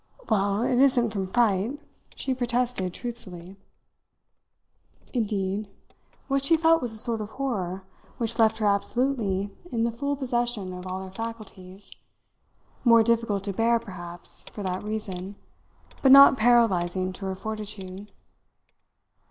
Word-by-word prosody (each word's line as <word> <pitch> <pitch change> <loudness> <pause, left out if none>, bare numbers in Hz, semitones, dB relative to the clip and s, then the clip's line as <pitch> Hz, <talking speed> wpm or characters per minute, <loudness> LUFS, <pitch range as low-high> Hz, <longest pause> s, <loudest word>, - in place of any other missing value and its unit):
"Well, 200 +1 +2
it 245 0 +2
isn't 255 -4 +4
from 195 -3 -3
fright," 225 +4 +1 0.4
she 265 - -2
protested 245 -6 -1
truthfully. 185 -5 -8 1.6
Indeed, 205 -3 -1 0.6
what 275 -1 0
she 330 +3 +4
felt 325 0 +4
was 245 -2 -1
a 220 - -4
sort 225 0 0
of 210 - -5
horror 195 -8 -3 0.3
which 235 0 -2
left 220 0 +4
her 215 - -1
absolutely 205 -1 0 0.2
in 230 -1 0
the 235 - +1
full 280 +5 -2
possession 240 -7 -2
of 180 0 -8
all 185 +1 -4
her 190 - -9
faculties; 200 -3 -8 0.9
more 230 -2 +6
difficult 225 -3 +1
to 200 -1 -3
bear, 230 +4 +3
perhaps, 175 -6 -7
for 205 - -7
that 185 0 -3
reason, 205 -3 -5 0.7
but 265 - +5
not 275 0 +10
paralysing 190 -7 +2
to 195 - -8
her 190 - -3
fortitude. 205 -2 -6
215 Hz, 135 wpm, -26 LUFS, 190-240 Hz, 1.6 s, not